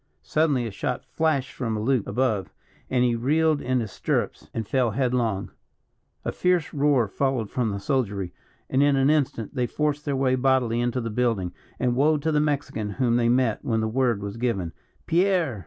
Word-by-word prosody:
Suddenly 150 -6 +1
a 115 - -4
shot 120 +5 -3
flashed 155 -5 0
from 115 -4 -2
a - - -2
loop 125 0 +1
above, 110 -8 0 0.4
and 125 -1 +2
he 120 -1 +3
reeled 150 +6 +2
in 130 0 0
his 110 -3 -5
stirrups - - -2
and 110 -2 -4
fell 130 -3 +2
headlong. 115 -4 0 0.7
A - - 0
fierce 180 -3 +1
roar 140 -5 +3
followed 125 0 -1
from 120 -3 0
the 100 -1 -3
soldiery; 100 -7 -1 0.3
and, 135 - +1
in 145 -1 +4
an 135 +2 +4
instant 135 -8 0
they 125 -3 0
forced 150 +1 -1
their 140 -2 0
way 130 -1 +2
bodily 130 -3 +2
into 120 +1 0
the 115 -1 -4
building, 105 -6 0 0.3
and 125 -1 +1
woe 150 +4 +3
to 155 +2 -1
the 150 - +2
Mexican 145 -8 -1
whom 120 0 +1
they 120 -1 +3
met 120 -3 +2
when 115 -2 0
the 110 - 0
word 120 -3 +1
was 100 +2 -5
given 100 -9 -1 0.3
"Pierre!" 175 - +2
125 Hz, 190 wpm, -25 LUFS, 115-140 Hz, 0.7 s, in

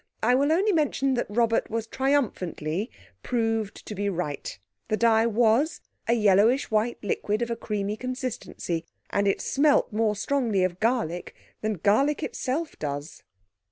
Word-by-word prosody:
I 245 +3 +4
will 280 +4 +3
only 390 +6 +3
mention 285 -5 +1
that 245 - -1
Robert 230 +1 +1
was 225 0 -2
triumphantly 220 - -1 0.3
proved 225 -4 -1
to - - -6
be 205 0 -1
right. 170 -6 -4 0.3
The 215 - 0
dye 225 0 +4
was 235 +7 +2 0.3
a 230 - +4
yellowish 220 +4 +3
white 220 +2 +1
liquid 210 +2 -1
of 235 - -3
a - - 0
creamy 210 -2 -3
consistency, 255 -9 -4 0.3
and 200 0 +1
it 195 - +1
smelt 285 -4 +2
more 215 -1 +1
strongly 220 -3 +1
of 185 -1 -1
garlic 220 -7 -1 0.3
than 215 0 0
garlic 275 +10 +3
itself 300 +5 -3
does. 145 +1 -5
225 Hz, 150 wpm, -26 LUFS, 205-255 Hz, 0.3 s, I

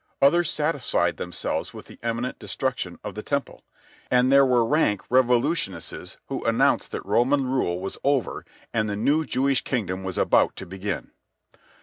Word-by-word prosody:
Others 170 +4 +4
satisfied 145 - 0
themselves 90 -2 -3
with - - -9
the - - -15
imminent 115 +2 -3
destruction 125 -9 -3
of 105 -1 -5
the 105 - -5
Temple. 140 +4 -3 0.5
And 125 +1 +3
there 140 0 +6
were 120 -2 +3
rank 115 -7 +2
revolutionists 130 +5 0
who - - -4
announced - - +2
that - - -4
Roman 125 +7 +2
rule 125 -9 0
was 95 +1 -6
over 140 -3 0 0.3
and 110 -2 +1
the 100 - -2
new 145 +9 +2
Jewish 135 -1 +1
kingdom 95 -7 -2
about 95 - +2
to - - -8
begin. 95 0 -5
125 Hz, 150 wpm, -25 LUFS, 100-140 Hz, 0.5 s, there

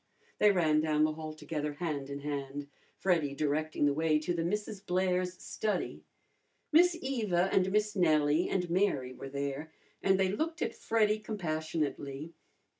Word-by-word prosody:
They 210 - +6
ran 155 -5 +3
down 155 -1 +2
the 155 - +3
hall 155 0 -6
together 150 -1 -3
hand 145 -3 -3
in 140 0 -5
hand, 140 0 -4 0.3
Freddy 165 -7 +1
directing 150 +1 0
the 145 - +3
way 155 +1 +2
to 155 +3 -1
the 170 -1 -1
Misses 210 +3 -2
Blair's 180 -1 0
study. 210 +3 -3 0.7
Miss 340 +2 +5
Eva 210 - 0
and 190 0 +3
Miss 210 +1 +1
Nellie 155 -2 +3
and 180 -2 0
Mary 170 -9 +1
were 135 - -8
there, 140 +3 -4 0.3
and 190 0 +3
they 190 -1 +3
looked 320 - -1
at - - -2
Freddy 215 -1 +1
compassionately. 155 -6 -3
165 Hz, 155 wpm, -31 LUFS, 150-195 Hz, 0.7 s, They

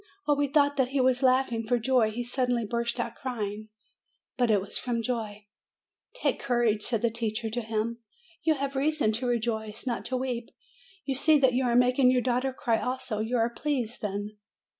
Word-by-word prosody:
While 290 -1 +2
we 290 0 +2
thought 285 0 +2
that 265 -2 +3
he 275 +2 -1
was 255 0 +3
laughing 255 -3 +3
for 235 +2 +1
joy, 240 -1 +2
he 235 +3 -4
suddenly 245 -1 0
burst 235 +2 -2
out 235 -1 -2
crying. 215 -4 -5 0.7
But 245 -2 +1
it 210 -2 +4
was 195 - -8
from 235 -2 -1
joy. 215 -4 -3 0.7
'Take - - 0
courage," 235 -4 +1
said 230 0 -1
the 235 - +2
teacher 225 0 -2
to 240 +2 -1
him; 225 +1 -2 0.4
"you 320 -1 +2
have 275 0 -3
reason 290 -4 +2
to 235 +4 -1
rejoice, 220 -2 -2
not 245 -2 -2
to 255 +2 -1
weep. 250 -2 -3 0.6
You 275 - -1
see 305 +4 +4
that 265 -3 +3
you 255 +1 +1
are 240 -1 +2
making 250 +1 +4
your 250 -1 +2
daughter 255 +1 0
cry 235 -3 0
also. 250 -4 -3
You 225 +3 0
are 230 +1 +1
pleased, 250 -3 -2
then?" 205 0 -4
240 Hz, 195 wpm, -28 LUFS, 225-260 Hz, 0.7 s, it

